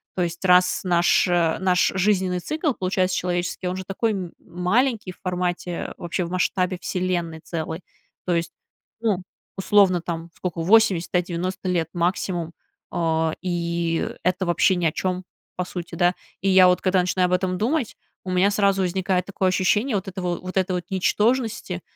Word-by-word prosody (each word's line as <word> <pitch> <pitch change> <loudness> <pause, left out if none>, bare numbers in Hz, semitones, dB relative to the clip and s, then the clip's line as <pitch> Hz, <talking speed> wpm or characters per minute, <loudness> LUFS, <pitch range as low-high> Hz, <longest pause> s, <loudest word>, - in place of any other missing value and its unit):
То 180 - +1
есть, 170 +1 -4
раз 180 0 +4
наш, 175 -1 +3
э, 170 -2 +2
наш 180 -1 +3
жизненный 190 -2 +1
цикл 310 - -1
получается 185 -2 0
человеческий, 180 0 -2
он 180 - -2
же 190 - -6
такой 220 +4 -1
м 185 -4 -4
маленький 210 +4 0
в - - -28
формате, 180 -1 -3
вообще 175 +1 -2
в - - -6
масштабе 185 0 0
Вселенной 180 -4 -2
целой. 160 0 -4 0.5
То 175 -2 +1
есть, 170 0 -1 0.5
ну, 210 -5 +1 0.4
условно, 190 -2 +4
там, 170 0 -5
сколько, 175 -2 -4
80, 190 -2 +4
да, 180 - +4
90 185 +2 -4
лет 170 -3 0
максимум, 175 -1 -1 0.4
а, 160 -1 0
и 170 -2 -1
это 185 +1 +1
вообще 175 +2 +3
ни 175 -2 -1
о 160 - +3
чём, 185 +2 -2 0.3
по 180 - -1
сути, 175 -1 -7
да. 175 +1 +3 0.3
И 195 - +1
я 185 -1 +7
вот 180 0 +3
когда 185 0 +2
начинаю 180 0 +1
об 180 - -1
этом 180 0 0
думать, 245 - -1 0.3
у 185 - -3
меня 185 +2 +3
сразу 200 -1 +2
возникает 185 0 0
такое 190 -1 0
ощущение 210 +6 +1
вот 195 -1 -2
этого, 180 -2 -3
вот 185 0 -7
этой 185 0 +1
вот 180 -1 -2
ничтожности, 210 0 0
180 Hz, 170 wpm, -23 LUFS, 175-190 Hz, 0.5 s, я